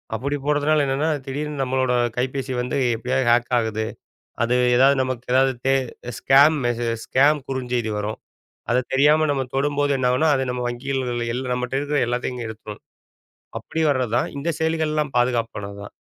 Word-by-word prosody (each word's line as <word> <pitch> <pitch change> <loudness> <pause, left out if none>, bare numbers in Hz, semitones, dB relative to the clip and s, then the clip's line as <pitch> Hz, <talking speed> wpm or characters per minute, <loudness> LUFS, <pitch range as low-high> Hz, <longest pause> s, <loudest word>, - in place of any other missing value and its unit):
அப்படி 140 +6 -2
போடுறதுனால 150 +1 +2
என்னன்னா, 140 +4 0 0.2
திடீர்னு 145 +1 -4
நம்மளோட 130 -1 0 0.2
கைபேசி 130 +1 -2
வந்து 125 +3 -2 0.2
எப்படியோ 125 +3 -2
ஹாக் 120 +1 +2
ஆகுது. 110 -1 -1 0.6
அது 120 +1 +1 0.2
எதாவது 135 +2 +5
நமக்கு 130 -2 -4
எதாவது 130 +1 +4
தே 135 - +4 0.4
ஸ்கேம் 140 +4 +5
மெசேஜ் 115 -1 -2
ஸ்கேம் 145 +3 +4
குறுஞ்செய்தி 125 -4 -2
வரும். 105 +1 -4 0.5
அத 120 - +3 0.2
தெரியாம 150 +3 +4
நம்ம 135 -2 0
தொடும்போது 145 +1 +1
என்ன 130 -1 +1
ஆகும்னா? 155 +6 +2
அது 130 - 0
நம்ம 125 0 -3
வங்கிகள்ல 120 -1 -3
எல்லாம் 125 0 -2
நம்மட்ட 125 +1 -3
இருக்குற 145 +1 -1
எல்லாத்தையும் 125 0 -3
எடுத்துரும். 110 -1 -9 0.8
அப்படி 160 - -4
வர்றதுதான் 125 -3 0
இந்தச் 155 +2 -2
செயலிகள் 160 -1 0
எல்லாம் 150 -2 -1
பாதுகாப்பானது 115 -5 -1
தான். - - -11
130 Hz, 155 wpm, -22 LUFS, 120-145 Hz, 0.8 s, எதாவது